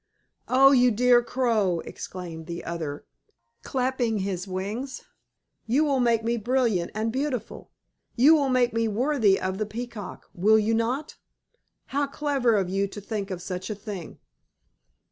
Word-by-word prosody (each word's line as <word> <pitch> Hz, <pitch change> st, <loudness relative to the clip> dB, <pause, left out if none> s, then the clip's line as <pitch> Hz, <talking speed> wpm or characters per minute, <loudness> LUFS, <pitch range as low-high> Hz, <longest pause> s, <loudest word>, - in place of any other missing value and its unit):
"Oh, 270 Hz, +2 st, +6 dB
you 250 Hz, -2 st, +5 dB
dear 245 Hz, +2 st, +4 dB
Crow!" 225 Hz, -9 st, 0 dB
exclaimed 165 Hz, -3 st, -8 dB
the 170 Hz, 0 st, -6 dB
other, 160 Hz, -4 st, -5 dB, 0.6 s
clapping 250 Hz, -, -1 dB
his 190 Hz, -1 st, -3 dB
wings. 205 Hz, +8 st, -4 dB, 0.6 s
"You 265 Hz, +7 st, +3 dB
will 280 Hz, -3 st, +1 dB
make 235 Hz, -2 st, +2 dB
me 235 Hz, +1 st, 0 dB
brilliant 230 Hz, -6 st, +1 dB
and 220 Hz, +1 st, -1 dB
beautiful! 260 Hz, -3 st, -4 dB, 0.5 s
You 275 Hz, +6 st, +6 dB
will 285 Hz, -4 st, +3 dB
make 250 Hz, -2 st, +2 dB
me 230 Hz, 0 st, +1 dB
worthy 220 Hz, -2 st, +2 dB
of 190 Hz, +1 st, -3 dB
the 215 Hz, -, -1 dB
Peacock, 220 Hz, -3 st, -7 dB
will 210 Hz, +5 st, +4 dB
you 220 Hz, +1 st, +1 dB
not? 245 Hz, +6 st, -1 dB, 0.8 s
How 285 Hz, 0 st, +1 dB
clever 275 Hz, -5 st, +1 dB
of 195 Hz, -3 st, +1 dB
you 195 Hz, +2 st, 0 dB
to 195 Hz, -, -9 dB
think 205 Hz, -1 st, -4 dB
of 180 Hz, -2 st, -5 dB
such 185 Hz, +1 st, -5 dB
a 215 Hz, -, -3 dB
thing!" 200 Hz, -5 st, -8 dB
225 Hz, 150 wpm, -26 LUFS, 195-255 Hz, 0.8 s, Oh